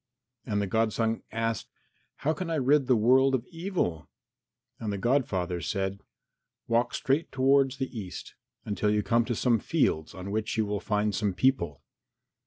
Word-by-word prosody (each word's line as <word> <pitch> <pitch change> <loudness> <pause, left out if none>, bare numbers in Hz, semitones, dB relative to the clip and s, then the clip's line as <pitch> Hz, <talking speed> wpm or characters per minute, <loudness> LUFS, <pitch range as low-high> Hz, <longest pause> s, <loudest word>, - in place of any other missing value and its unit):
And 105 -3 0
the 100 - 0
godson 115 +2 0
asked, 115 0 -2 0.5
"How 155 - 0
can 185 0 -5
I 165 - 0
rid 140 -1 +3
the 130 - +5
world 130 +4 +4
of 125 -1 -3
evil?" 165 - -2 0.7
And 110 -2 -3
the 100 - -2
godfather 95 -8 0
said, 95 0 -2 0.7
"Walk 115 +1 +1
straight 140 +5 0
towards 135 0 +3
the 130 -2 -4
east 95 -5 -7 0.3
until 105 0 0
you 105 0 +2
come 115 +1 +2
to 120 - -2
some 120 0 +2
fields 80 -4 0
on 95 +1 -6
which 110 +2 -2
you 110 - +2
will 105 0 -2
find 105 0 0
some 100 -1 -1
people. 85 - +1
115 Hz, 165 wpm, -28 LUFS, 100-130 Hz, 0.7 s, the